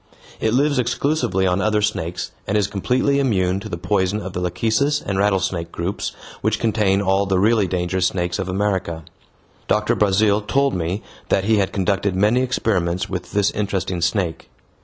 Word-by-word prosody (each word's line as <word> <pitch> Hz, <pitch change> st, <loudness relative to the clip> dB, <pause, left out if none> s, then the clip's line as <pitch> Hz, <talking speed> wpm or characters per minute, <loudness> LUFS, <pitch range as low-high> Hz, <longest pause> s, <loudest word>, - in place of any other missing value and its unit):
It 110 Hz, +1 st, +1 dB
lives 140 Hz, 0 st, +2 dB
exclusively 125 Hz, -5 st, 0 dB
on 90 Hz, +1 st, +1 dB
other 105 Hz, -1 st, +1 dB
snakes, 90 Hz, -4 st, -2 dB, 0.2 s
and 105 Hz, -, +1 dB
is 105 Hz, -, +2 dB
completely 125 Hz, +8 st, +1 dB
immune 95 Hz, -8 st, +1 dB
to 110 Hz, -, -8 dB
the 85 Hz, -, -4 dB
poison 95 Hz, +2 st, 0 dB
of 95 Hz, -3 st, -6 dB
the 90 Hz, -, -3 dB
lachecis 110 Hz, -, +1 dB
and 100 Hz, -1 st, -3 dB
rattlesnake 95 Hz, -4 st, 0 dB
groups, 90 Hz, +4 st, -3 dB, 0.3 s
which 110 Hz, +1 st, +1 dB
contain 105 Hz, -3 st, +1 dB
all 95 Hz, +1 st, +2 dB
the 95 Hz, -1 st, +1 dB
really 105 Hz, +1 st, +3 dB
dangerous 90 Hz, 0 st, 0 dB
snakes 90 Hz, 0 st, -2 dB
of 95 Hz, -1 st, -3 dB
America. 95 Hz, -4 st, -1 dB, 0.6 s
Doctor 105 Hz, 0 st, +2 dB
Brazil 105 Hz, +1 st, +3 dB
told 140 Hz, +6 st, +1 dB
me 90 Hz, +4 st, -2 dB, 0.3 s
that 95 Hz, -, +2 dB
he 110 Hz, +2 st, +3 dB
had 100 Hz, -2 st, +1 dB
conducted 95 Hz, 0 st, 0 dB
many 105 Hz, +6 st, +3 dB
experiments 95 Hz, -8 st, 0 dB
with 90 Hz, -, -5 dB
this 100 Hz, -1 st, +2 dB
interesting 95 Hz, -4 st, -2 dB
snake. 85 Hz, 0 st, -1 dB
100 Hz, 170 wpm, -21 LUFS, 90-110 Hz, 0.6 s, really